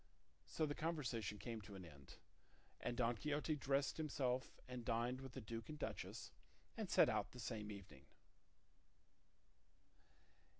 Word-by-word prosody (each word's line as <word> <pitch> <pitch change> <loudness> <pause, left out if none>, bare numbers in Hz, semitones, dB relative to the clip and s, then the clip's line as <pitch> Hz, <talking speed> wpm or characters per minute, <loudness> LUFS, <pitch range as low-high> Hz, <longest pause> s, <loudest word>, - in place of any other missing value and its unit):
'" - - -35
So 155 - +4
the 145 - 0
conversation 130 - 0
came 110 +2 -3
to 105 -1 -8
an 95 -2 -6
end, 70 -4 -11 0.6
and 120 - -1
Don 120 -1 +4
Quixote 150 +4 +1
dressed 140 0 +2
himself 130 -5 +1
and 125 -1 -4
dined 120 +2 +1
with 135 -2 -6
the 130 - -4
duke 115 +3 -4
and 155 - -4
duchess, - - -3 0.4
and - - -2
set - - +8
out - - +1
the 125 - -8
same 110 -3 -2
evening. 90 -10 -9
120 Hz, 145 wpm, -44 LUFS, 105-140 Hz, 0.6 s, set